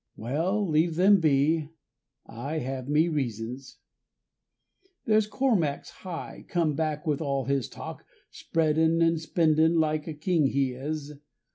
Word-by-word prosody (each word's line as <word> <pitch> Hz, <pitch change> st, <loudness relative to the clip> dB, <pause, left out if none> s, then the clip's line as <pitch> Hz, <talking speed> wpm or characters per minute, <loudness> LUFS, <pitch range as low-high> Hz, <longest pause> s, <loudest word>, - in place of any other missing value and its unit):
Well, 170 Hz, -, -1 dB
leave 160 Hz, +1 st, +2 dB
them 195 Hz, +3 st, +5 dB
be, 155 Hz, 0 st, +2 dB, 0.6 s
I 140 Hz, +8 st, -5 dB
have 130 Hz, -1 st, -4 dB
me 155 Hz, +3 st, +3 dB
reasons. 130 Hz, -3 st, -4 dB, 1.3 s
There's 215 Hz, -2 st, +3 dB
Cormac's 210 Hz, -, 0 dB
Hugh 180 Hz, -3 st, -7 dB
come 165 Hz, -4 st, +1 dB
back 150 Hz, 0 st, -2 dB
with 150 Hz, -2 st, 0 dB
all 140 Hz, -3 st, -1 dB
his 135 Hz, -3 st, -1 dB
talk, -, -, -8 dB, 0.3 s
Spreadin' 160 Hz, +1 st, +1 dB
and 165 Hz, 0 st, +2 dB
spendin' 160 Hz, 0 st, +2 dB
like 155 Hz, 0 st, 0 dB
a 160 Hz, -, -5 dB
king 155 Hz, -1 st, +1 dB
he 135 Hz, -1 st, 0 dB
is. 150 Hz, +3 st, -5 dB
155 Hz, 130 wpm, -27 LUFS, 140-165 Hz, 1.3 s, them